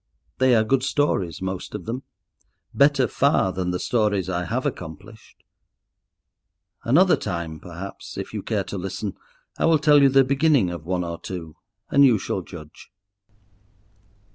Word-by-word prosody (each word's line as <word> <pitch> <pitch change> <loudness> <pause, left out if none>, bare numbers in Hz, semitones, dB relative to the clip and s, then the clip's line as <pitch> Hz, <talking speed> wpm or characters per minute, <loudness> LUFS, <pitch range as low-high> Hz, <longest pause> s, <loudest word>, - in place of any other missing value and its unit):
They 130 -1 +4
are 110 - +4
good 130 +4 +1
stories, 130 - -1
most 95 +2 -5
of 105 - -7
them; 120 +4 -4 0.7
better 140 -2 +4
far 140 -6 +2
than 90 -1 -3
the 90 - -1
stories 105 -4 0
I 90 0 -2
have - - -2
accomplished. 80 -2 -8 1.4
Another 175 +10 +4
time, 85 -5 -5
perhaps, 90 +4 -9
if - - -6
you - - -3
care - - -1
to 100 - -6
listen, 95 +2 -4 0.5
I - - +2
will 165 -1 +5
tell 150 -1 +5
you 140 - +6
the 135 0 +5
beginning 140 - +2
of 85 -2 -8
one 90 0 -1
or 85 -1 -5
two 85 -4 -7 0.4
and 140 - +5
you 125 -5 +6
shall 95 - -3
judge. 80 -3 -12
100 Hz, 155 wpm, -23 LUFS, 90-135 Hz, 1.4 s, you